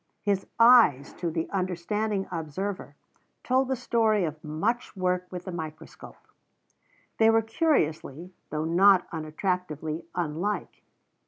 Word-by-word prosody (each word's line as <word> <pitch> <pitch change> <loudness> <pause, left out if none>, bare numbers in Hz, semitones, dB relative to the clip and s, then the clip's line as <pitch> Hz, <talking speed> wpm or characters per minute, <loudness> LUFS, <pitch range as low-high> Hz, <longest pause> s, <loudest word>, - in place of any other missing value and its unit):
His 200 -2 0
eyes, 230 - +6
to 175 - -1
the 160 0 -2
understanding 195 +2 -1
observer, 180 +4 -5 0.5
told 260 +1 +2
the 265 - 0
story 225 -4 +1
of 155 -1 -6
much 200 +10 -2
work 180 0 0
with 180 -1 -7
the 185 - -5
microscope. 160 -2 -8 1.0
They 225 0 +6
were 225 0 +4
curiously, 180 - -1 0.2
though 155 0 -2
not 185 +2 +5
unattractively, 160 -1 -3
unlike. 175 +4 -3
180 Hz, 115 wpm, -27 LUFS, 160-215 Hz, 1.0 s, eyes